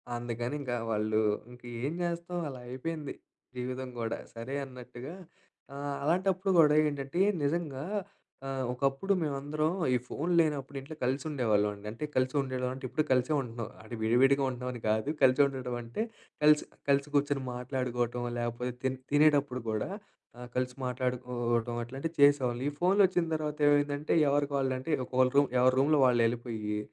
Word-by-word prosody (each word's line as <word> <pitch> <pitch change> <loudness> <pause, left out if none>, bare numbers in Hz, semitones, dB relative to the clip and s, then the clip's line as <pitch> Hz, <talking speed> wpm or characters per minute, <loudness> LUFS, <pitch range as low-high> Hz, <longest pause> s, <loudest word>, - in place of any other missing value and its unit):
అందుకని 120 +3 -3
ఇంకా 125 -3 -2 0.2
వాళ్ళు 110 0 +1 0.3
ఇంక 125 0 -14 0.2
ఏం 150 - -1
చేస్తాం 170 +1 -3
అలా 130 -3 -7
అయిపోయింది 150 +3 -4 0.4
జీవితం 130 +1 -4
కూడా. 115 -1 -2 0.2
సరే 115 +4 -6
అన్నట్టుగా 125 +2 -9 0.6
ఆహ్ 140 0 -4
అలాంటప్పుడు 185 +4 +1
కూడా 150 -1 +6
ఏంటంటే, 140 +3 -4 0.2
నిజంగా 145 -3 -1 0.6
ఆహ్ 135 -1 -2
ఒకప్పుడు 135 +9 0
మేమందరం 150 +1 -1 0.3
ఈ - - +4
ఫోన్ 170 +5 -2
లేనప్పుడు 145 -4 0
ఇంట్లో 145 +4 -9
కలిసి 130 +4 0
ఉండేవాళ్ళం 110 -7 +2
అండి. 100 +1 -14
అంటే 135 +7 -4
కలిసి 130 +2 +1
ఉండడం 130 -1 -2
అంటే 130 - -10
ఇప్పుడు 135 +5 0
కలిసే 130 +4 +3
ఉంటున్నాం, 115 -2 -6
అంటే 120 - -7
విడివిడిగా 135 +5 +4
ఉంటున్నామని 125 -1 -5
కాదు. 110 +6 +1
కలిసి 130 +2 +6
ఉండడం 130 -3 -3
అంటే, 115 - -4 0.4
కలిసి, 150 0 +6 0.2
కలిసి 140 +1 +3
కూర్చొని 145 -1 +1
మాట్లాడుకోవటం, 125 -1 -2
లేకపోతే 120 +1 -2
తి 130 - +2 0.2
తినేటపుడు 145 -4 +4
కూడా, 110 +7 -1 0.5
ఆ! - - -10
కలిసి 125 0 -1
మాట్లాడుకోవడం 125 -2 -1
అట్లాంటివి 135 +7 -5
చేసేవాళ్ళం. 130 -4 +4
ఈ - - -6
ఫో‌న్‌లోచ్చిన 185 -1 +4
తర్వాత 150 -1 -3
ఏమైందంటే, 145 0 +2 0.2
ఎవరికి 145 0 +1
వాళ్ళ 135 -1 +1
అంటే 160 +5 -4
ఒక 130 0 +3
రూమ్ 145 -1 +5
ఎవరి 130 0 +5
రూమ్‌లో 145 +1 +4
వాళ్ళు 120 -2 +4
వెళ్ళిపోయి, 115 -3 -2
130 Hz, 150 wpm, -30 LUFS, 125-145 Hz, 0.6 s, కూడా